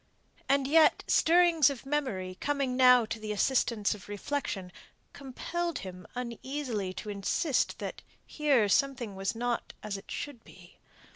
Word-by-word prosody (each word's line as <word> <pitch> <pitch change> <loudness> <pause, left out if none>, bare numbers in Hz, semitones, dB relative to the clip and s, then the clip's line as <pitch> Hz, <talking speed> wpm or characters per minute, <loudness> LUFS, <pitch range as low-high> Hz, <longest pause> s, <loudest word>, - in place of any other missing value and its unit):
And 275 0 +3
yet, 315 +1 +5
stirrings 335 -3 +5
of 270 -2 -7
memory 255 -11 -2
coming 280 -3 0
now 250 -2 +6
to 225 +1 -5
the 215 0 -5
assistance 220 -1 +1
of 205 -1 -12
reflection, 205 -4 -3 0.4
compelled 335 +5 -4
him 180 -2 -9
uneasily 245 -4 -4
to 210 - -6
insist 205 - 0
that - - -6 0.2
here 280 -8 +2
something 245 -1 0
was 195 +3 -2
not 240 +1 -2
as 210 -2 -3
it 195 - -14
should 265 -6 -6
be. - - -17
250 Hz, 140 wpm, -30 LUFS, 205-285 Hz, 0.4 s, now